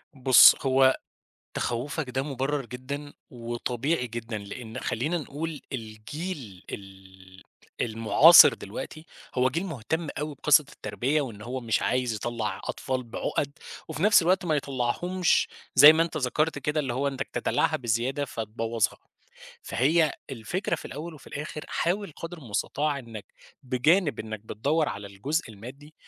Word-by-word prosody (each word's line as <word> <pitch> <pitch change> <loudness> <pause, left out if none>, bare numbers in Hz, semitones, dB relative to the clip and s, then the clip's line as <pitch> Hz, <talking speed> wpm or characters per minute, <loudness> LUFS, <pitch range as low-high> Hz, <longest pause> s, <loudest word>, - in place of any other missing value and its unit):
بُصّ 130 -2 +8
هو 130 -1 +4 0.6
تخوّفك 130 +4 -3
ده 130 +1 -1
مُبرَر 140 0 -2
جدًا، 140 +4 -7 0.2
وطبيعي 125 +3 -2
جدًا 115 -1 -5
لإن 110 +3 -8
خلّينا 155 +9 -1
نقول 155 0 -5
الجيل 110 - -7
ال 95 -1 -12 0.4
المُعاصر 115 +8 +7
دلوقتي، 120 +9 -8 0.3
هو 130 +1 +3
جيل 165 +8 -2
مهتم 160 - -3
أو 150 0 -3
بقصّة 150 +2 +4
التربيّة 145 +5 -1
وإن 115 -7 -6
هو 125 +4 -4
مش 115 -2 0
عايز 125 -1 0
يطلّع 110 0 -3
أطفال 130 -1 -3
بعُقَد، 125 +4 -3 0.4
وفي 160 +1 -4
نفْس 210 -3 +6
الوقت 185 +2 +2
ما 155 -2 +1
يطلّعهمش 145 +7 0 0.3
زي 145 +4 +10
ما 165 - +3
أنت 165 -2 -4
ذَكرت 150 +3 0
كده 150 +3 -1
اللي 130 -5 -2
هو 140 +3 0
إنتك 135 -1 -4
تدلّعها - - +1
بزيادة 125 +4 -1
فتبوّظها، 115 -2 -2 0.6
فهي 155 +5 +2 0.2
الفكرة 135 - -2
في - - -11
الأول 160 +4 -7
وفي 150 - -14
الآخر 150 +1 -6
حاول 190 +1 -1
قدر 165 +1 -7
المُستطاع 140 +4 -2
إنّك 115 -4 -9 0.4
بجانب 145 +7 +2
إنّك 110 -1 -5
بتدوّر 145 +9 -1
على 100 0 -6
الجزء 130 - -3
المادي، 130 +9 -11
130 Hz, 140 wpm, -27 LUFS, 115-155 Hz, 0.6 s, زي